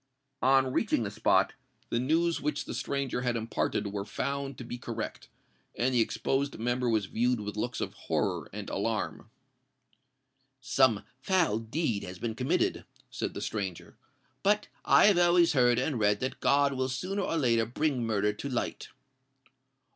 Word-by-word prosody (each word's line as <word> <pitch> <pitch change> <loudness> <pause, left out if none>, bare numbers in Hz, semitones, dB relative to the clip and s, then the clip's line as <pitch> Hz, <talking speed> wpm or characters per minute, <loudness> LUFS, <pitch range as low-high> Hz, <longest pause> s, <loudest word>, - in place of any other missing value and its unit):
On 130 0 +4
reaching - - +1
the - - -3
spot, - - +2 0.4
the 115 - +1
news 165 +6 +1
which 150 0 -2
the - - -5
stranger 140 -3 -2
had 125 -1 0
imparted 110 -2 -1
were 100 -1 -2
found 140 +5 -3
to - - -7
be 120 +1 -6
correct; 115 -2 -6 0.5
and 130 +2 +1
the 120 - +4
exposed 135 +4 -1
member 120 +2 0
was 110 -3 +1
viewed 120 +4 +1
with 105 0 -5
looks 120 +4 -2
of - - -3
horror - - -2
and 100 0 -6
alarm. 110 +1 -2 1.3
"Some 130 -4 +3 0.2
foul 170 - +2
deed 115 -1 -1
has 90 0 -7
been 115 +3 -3
committed," 125 +3 0 0.3
said - - -4
the - - -4
stranger; 95 -5 -4 0.5
"but 210 +1 +2 0.2
I - - +6
have 200 -4 +5
always 175 -1 +5
heard 125 -3 +4
and 130 0 0
read 105 -1 +3
that 130 - -3
God 140 0 +3
will 130 0 -1
sooner 185 +10 -2
or 165 - -1
later 115 -6 +2
bring 130 0 0
murder 105 -2 +1
to 140 +7 -6
light." 125 - -3
125 Hz, 160 wpm, -29 LUFS, 110-140 Hz, 1.3 s, I